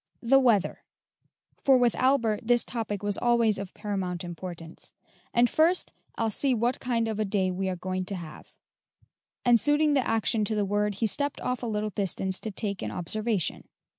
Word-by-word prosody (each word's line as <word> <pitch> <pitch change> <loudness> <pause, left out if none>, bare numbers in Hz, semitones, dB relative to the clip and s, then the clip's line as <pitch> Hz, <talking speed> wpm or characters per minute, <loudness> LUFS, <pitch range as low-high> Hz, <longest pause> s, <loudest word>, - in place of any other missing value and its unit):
"The 270 +3 +5
weather;" 230 -7 +2 0.8
for 270 -2 +6
with 245 -2 +3
Albert 245 -5 +2
this 240 -1 +3
topic 215 -4 -3
was 205 -1 -1
always 235 -4 +3
of 195 -2 -6
paramount 190 -4 -3
importance. 170 -1 -7 0.4
"And 240 +1 +4
first, 330 +7 +2 0.2
I'll 225 -1 0
see 265 +4 +1
what 240 +2 0
kind 235 -2 0
of 220 -1 -3
a - - +2
day 195 -2 0
we 190 +1 -2
are 185 - -2
going 185 +1 -3
to 195 - -1
have;" 165 -4 -10 0.9
and 240 -1 +6
suiting 295 +2 +3
the 280 - +4
action 225 0 +1
to 215 - -1
the 205 -1 +1
word, 205 +1 0
he 225 - 0
stepped 285 +6 -1
off 250 -1 -2
a 240 - -3
little 215 -1 -2
distance 190 -1 -1
to 220 - -4
take 200 -1 -3
an - - -3
observation. 210 +1 -2
215 Hz, 185 wpm, -27 LUFS, 195-240 Hz, 0.9 s, for